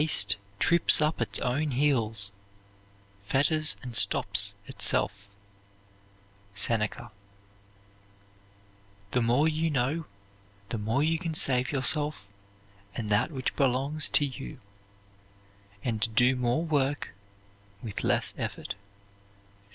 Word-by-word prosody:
Haste 105 Hz, -10 st, +2 dB, 0.2 s
trips 170 Hz, -, +4 dB
up 155 Hz, +1 st, 0 dB
its -, -, -1 dB
own 145 Hz, +5 st, -1 dB
heels, 115 Hz, -7 st, 0 dB, 0.9 s
fetters 145 Hz, +9 st, +1 dB
and 125 Hz, -2 st, -8 dB
stops 105 Hz, -, +5 dB
itself. 100 Hz, 0 st, +1 dB, 1.3 s
SENECA. 110 Hz, +2 st, -1 dB, 2.0 s
The 125 Hz, -, +1 dB
more 120 Hz, +7 st, +2 dB
you 160 Hz, +1 st, -1 dB
know, 150 Hz, +3 st, -1 dB, 0.6 s
the 115 Hz, -, -4 dB
more 110 Hz, +7 st, -1 dB
you 160 Hz, +1 st, 0 dB
can 165 Hz, -3 st, -4 dB
save 130 Hz, -3 st, +3 dB
yourself 145 Hz, -6 st, 0 dB, 0.6 s
and 110 Hz, -3 st, -4 dB
that 105 Hz, +6 st, +1 dB
which 135 Hz, -4 st, -4 dB
belongs 140 Hz, +3 st, +2 dB
to 145 Hz, -, +3 dB
you, 135 Hz, +1 st, -8 dB, 1.2 s
and 115 Hz, -1 st, -2 dB
do 125 Hz, +2 st, +4 dB
more 125 Hz, +6 st, -1 dB
work 145 Hz, -3 st, -1 dB, 0.7 s
with 110 Hz, -4 st, -6 dB
less -, -, +1 dB
effort. -, -, -5 dB
130 Hz, 105 wpm, -27 LUFS, 115-150 Hz, 2.0 s, stops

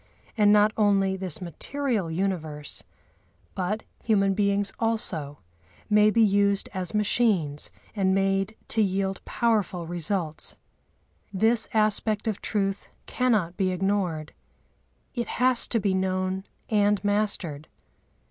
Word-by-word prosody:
And 210 Hz, -3 st, +5 dB
not 210 Hz, +1 st, +5 dB
only 195 Hz, -3 st, +3 dB
this 185 Hz, -3 st, -5 dB
material 215 Hz, -, -2 dB
universe, 160 Hz, -4 st, -3 dB, 0.7 s
but 195 Hz, +4 st, -2 dB, 0.2 s
human 195 Hz, -3 st, +3 dB
beings 200 Hz, 0 st, +1 dB
also, 175 Hz, -11 st, -1 dB, 0.5 s
may 210 Hz, 0 st, +6 dB
be 225 Hz, +1 st, +4 dB
used 200 Hz, -1 st, +2 dB
as 185 Hz, +2 st, -4 dB
machines 205 Hz, -9 st, +1 dB, 0.3 s
and 190 Hz, -2 st, +2 dB
made 195 Hz, +2 st, +1 dB
to 225 Hz, -, +2 dB
yield 195 Hz, -1 st, -1 dB
powerful 205 Hz, -7 st, 0 dB
results. 170 Hz, -1 st, -3 dB, 0.8 s
This 220 Hz, +4 st, +4 dB
aspect 215 Hz, 0 st, +1 dB
of 215 Hz, -3 st, -2 dB
truth 195 Hz, -1 st, -2 dB, 0.2 s
cannot 215 Hz, -9 st, 0 dB
be 190 Hz, -1 st, +1 dB
ignored; 185 Hz, -4 st, -1 dB, 0.8 s
it 240 Hz, -3 st, -3 dB
has 250 Hz, -1 st, +3 dB
to 230 Hz, -, 0 dB
be 200 Hz, -2 st, +1 dB
known 185 Hz, 0 st, -1 dB, 0.2 s
and 205 Hz, -1 st, +2 dB
mastered. 200 Hz, -8 st, -1 dB
195 Hz, 115 wpm, -26 LUFS, 185-215 Hz, 0.8 s, may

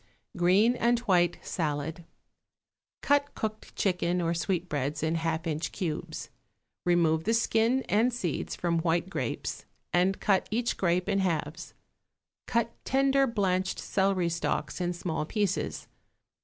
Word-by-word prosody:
=Green 190 Hz, +7 st, +4 dB
and 240 Hz, 0 st, +2 dB
White 175 Hz, -6 st, +3 dB
Salad.= 160 Hz, +1 st, -3 dB, 1.0 s
Cut 285 Hz, 0 st, +2 dB
cooked 215 Hz, 0 st, -5 dB
chicken 180 Hz, -2 st, +1 dB
or 170 Hz, -1 st, +1 dB
sweetbreads 160 Hz, -5 st, -2 dB
in 160 Hz, 0 st, +1 dB
half 165 Hz, 0 st, -1 dB
inch 155 Hz, -1 st, -2 dB
cubes; 165 Hz, -6 st, -4 dB, 0.6 s
remove 160 Hz, -2 st, +3 dB
the 225 Hz, +2 st, +3 dB
skin 230 Hz, +3 st, +2 dB
and 225 Hz, +5 st, +2 dB
seeds 185 Hz, -, -3 dB
from 170 Hz, -1 st, 0 dB
white 170 Hz, +2 st, 0 dB
grapes, -, -, -3 dB, 0.3 s
and 185 Hz, +2 st, +2 dB
cut 195 Hz, -2 st, +2 dB
each 235 Hz, +2 st, 0 dB
grape 180 Hz, 0 st, +1 dB
in 200 Hz, -1 st, +1 dB
halves; 165 Hz, -2 st, -2 dB, 0.7 s
cut 230 Hz, -1 st, +1 dB
tender 275 Hz, 0 st, +3 dB
blanched 190 Hz, -5 st, 0 dB
celery 190 Hz, -3 st, +1 dB
stalks 170 Hz, +2 st, -2 dB
in 175 Hz, 0 st, 0 dB
small 170 Hz, -3 st, -2 dB
pieces. 200 Hz, +3 st, -1 dB
180 Hz, 130 wpm, -29 LUFS, 165-215 Hz, 1.0 s, =Green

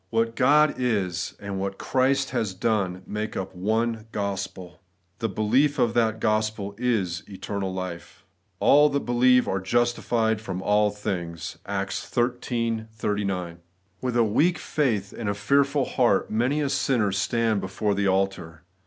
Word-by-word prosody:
What 115 Hz, 0 st, 0 dB
God 145 Hz, +3 st, +4 dB
is, 100 Hz, -8 st, -1 dB
and 100 Hz, -1 st, -5 dB
what 95 Hz, 0 st, -3 dB
Christ 135 Hz, +1 st, +1 dB
has 100 Hz, -4 st, -1 dB
done, 95 Hz, -3 st, -1 dB
make 105 Hz, +1 st, -4 dB
up 95 Hz, 0 st, -4 dB
one 110 Hz, +4 st, -1 dB
gospel. 95 Hz, -3 st, -4 dB, 0.4 s
The 115 Hz, -1 st, -1 dB
belief 125 Hz, +9 st, +2 dB
of 120 Hz, -3 st, +2 dB
that 110 Hz, -2 st, +1 dB
gospel 110 Hz, -2 st, 0 dB
is 100 Hz, -8 st, 0 dB
eternal 95 Hz, 0 st, -4 dB
life. 90 Hz, -2 st, -7 dB, 0.2 s
' -, -, -45 dB
All 150 Hz, +1 st, +6 dB
that 140 Hz, 0 st, 0 dB
believe 125 Hz, +1 st, +4 dB
are 95 Hz, -, 0 dB
justified 115 Hz, +1 st, +1 dB
from 95 Hz, -4 st, -4 dB
all 105 Hz, 0 st, +3 dB
things 90 Hz, -5 st, -5 dB
' -, -, -39 dB
(Acts -, -, -2 dB
xiii 120 Hz, -2 st, -1 dB
39). 100 Hz, -5 st, -2 dB, 0.4 s
With 125 Hz, -2 st, -1 dB
a 120 Hz, -, +5 dB
weak 155 Hz, -, +2 dB
faith 115 Hz, -13 st, -1 dB
and 110 Hz, -3 st, -3 dB
a 100 Hz, -, -1 dB
fearful 140 Hz, +6 st, +2 dB
heart 125 Hz, -3 st, +1 dB
many 125 Hz, +7 st, +1 dB
a 140 Hz, -, 0 dB
sinner 125 Hz, -7 st, +1 dB
stands 110 Hz, +2 st, 0 dB
before 95 Hz, +2 st, -1 dB
the 100 Hz, 0 st, 0 dB
altar. 95 Hz, -4 st, -1 dB
110 Hz, 155 wpm, -25 LUFS, 95-120 Hz, 0.4 s, All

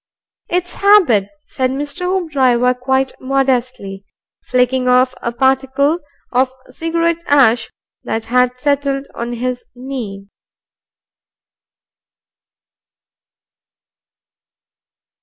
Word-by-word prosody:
"It's 355 Hz, 0 st, -1 dB
habit," 355 Hz, -, +4 dB, 0.2 s
said 260 Hz, -1 st, -1 dB
Mr. 290 Hz, +6 st, -4 dB
Hoopdriver, 265 Hz, -9 st, +2 dB
quite 265 Hz, +1 st, +1 dB
modestly, 255 Hz, -7 st, -1 dB, 0.4 s
flicking 250 Hz, 0 st, +1 dB
off 255 Hz, +1 st, +4 dB
a 235 Hz, -, -2 dB
particle 265 Hz, +5 st, +1 dB, 0.3 s
of 255 Hz, +1 st, +2 dB, 0.2 s
cigarette 335 Hz, +4 st, -1 dB
ash 255 Hz, -5 st, +4 dB, 0.3 s
that 225 Hz, 0 st, -3 dB
had 250 Hz, +1 st, +1 dB
settled 280 Hz, -1 st, 0 dB
on 235 Hz, +1 st, -4 dB
his 250 Hz, +1 st, -3 dB
knee. 245 Hz, -7 st, -6 dB
260 Hz, 80 wpm, -17 LUFS, 250-285 Hz, 0.4 s, habit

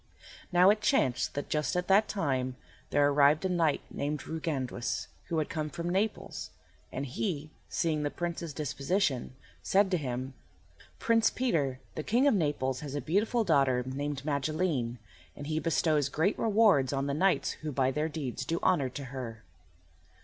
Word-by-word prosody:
Now 180 Hz, +2 st, +7 dB
it 210 Hz, 0 st, 0 dB
chanced 130 Hz, -, +1 dB
that 145 Hz, -, -3 dB
just 150 Hz, +2 st, -1 dB
at 180 Hz, 0 st, -1 dB
that 200 Hz, +3 st, +5 dB
time 130 Hz, -9 st, -1 dB, 0.3 s
there 145 Hz, 0 st, +4 dB
arrived 145 Hz, +3 st, +4 dB
a -, -, +1 dB
knight 165 Hz, -5 st, +2 dB
named 145 Hz, 0 st, -3 dB
Ruiganduis, 140 Hz, -7 st, -3 dB, 0.2 s
who 170 Hz, -, -2 dB
had 155 Hz, -, +1 dB
come 155 Hz, -1 st, -3 dB
from 170 Hz, +3 st, -4 dB
Naples, 200 Hz, +4 st, -2 dB, 0.4 s
and 135 Hz, -, -3 dB
he, 155 Hz, -, -3 dB, 0.2 s
seeing 160 Hz, -3 st, 0 dB
the 145 Hz, -, 0 dB
Prince's 170 Hz, 0 st, -4 dB
disposition, 140 Hz, -1 st, -1 dB, 0.3 s
said 195 Hz, 0 st, +3 dB
to 180 Hz, -, +3 dB
him, 130 Hz, -2 st, -4 dB, 0.6 s
"Prince 230 Hz, -1 st, +3 dB
Peter, 150 Hz, -, 0 dB
the -, -, -3 dB
King 240 Hz, -, +2 dB
of 285 Hz, -, +5 dB
Naples 145 Hz, -, 0 dB
has 145 Hz, -1 st, -6 dB
a -, -, 0 dB
beautiful 210 Hz, +9 st, +1 dB
daughter 135 Hz, -8 st, +3 dB
named 140 Hz, +1 st, -4 dB
Magilene, 145 Hz, -4 st, -1 dB, 0.4 s
and 145 Hz, -, -7 dB
he 155 Hz, +1 st, -1 dB
bestows 155 Hz, -3 st, +1 dB
great 160 Hz, +9 st, 0 dB
rewards 210 Hz, -, +4 dB
on 135 Hz, 0 st, -1 dB
the 140 Hz, -, -1 dB
knights 185 Hz, +6 st, +2 dB
who 155 Hz, -1 st, -3 dB
by 130 Hz, -1 st, +1 dB
their 150 Hz, +4 st, -1 dB
deeds 140 Hz, -5 st, -4 dB
do 165 Hz, +6 st, -1 dB
honour 140 Hz, -8 st, +3 dB
to 140 Hz, +3 st, -7 dB
her." 115 Hz, -4 st, -6 dB
150 Hz, 165 wpm, -30 LUFS, 135-180 Hz, 0.6 s, Now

